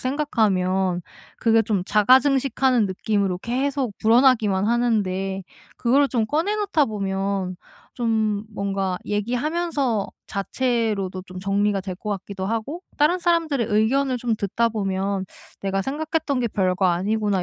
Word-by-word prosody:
생각하면 190 -10 0 0.4
그게 225 -1 +4
좀 205 -4 0
자가 215 +6 +5
증식하는 265 -4 +2
느낌으로 195 -1 -1
계속 255 +1 -2
불어나기만 220 -4 +4
하는데 195 -5 0 0.3
그거를 275 +4 +3
좀 230 -4 0
꺼내 325 - 0
놓다 395 -8 +2
보면 195 -3 -2 0.4
좀 220 -3 0
뭔가 195 -2 -2
얘기하면서 250 - -1 0.2
자체로도 205 -4 -1
좀 185 0 -9
정리가 200 +1 +1
될 185 -1 -5
것 210 - -5
같기도 195 -1 -4
하고 230 - -3 0.2
다른 320 +5 +3
사람들의 330 -8 +1
의견을 255 +5 +2
좀 235 -2 0
듣다 215 +3 0
보면 195 -2 -2 0.4
'내가 195 0 0
생각했던 300 - -1
게 235 - 0
별거 185 -1 +1
아니구나.' 200 +2 +1
220 Hz, 300 characters per minute, -23 LUFS, 195-260 Hz, 0.4 s, 자가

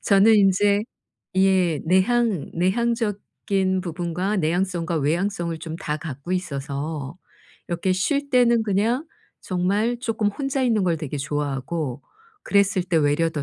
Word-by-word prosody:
저는 205 +2 +5
인제 200 +1 +3 0.5
예 185 -5 +3
내향 195 - +2
내향적인 195 -1 0
부분과 175 +3 -2
내향성과 175 0 0
외향성을 170 +2 -1
좀 160 0 -6
다 150 -2 -3
갖고 150 +3 -6
있어서 145 -2 -4 0.5
이렇게 180 +2 0
쉴 280 +10 0
때는 240 -3 +4
그냥 225 - 0 0.3
정말 205 +6 0
쪼끔 225 -4 -1
혼자 270 +4 -2
있는 225 -6 +2
걸 170 -2 +1
되게 150 -2 -5
좋아하고. 140 0 -3 0.5
그랬을 195 -2 +3
때 175 -2 0
외려 150 +2 +2
더 150 -3 -3
185 Hz, 265 characters per minute, -23 LUFS, 160-205 Hz, 0.5 s, 저는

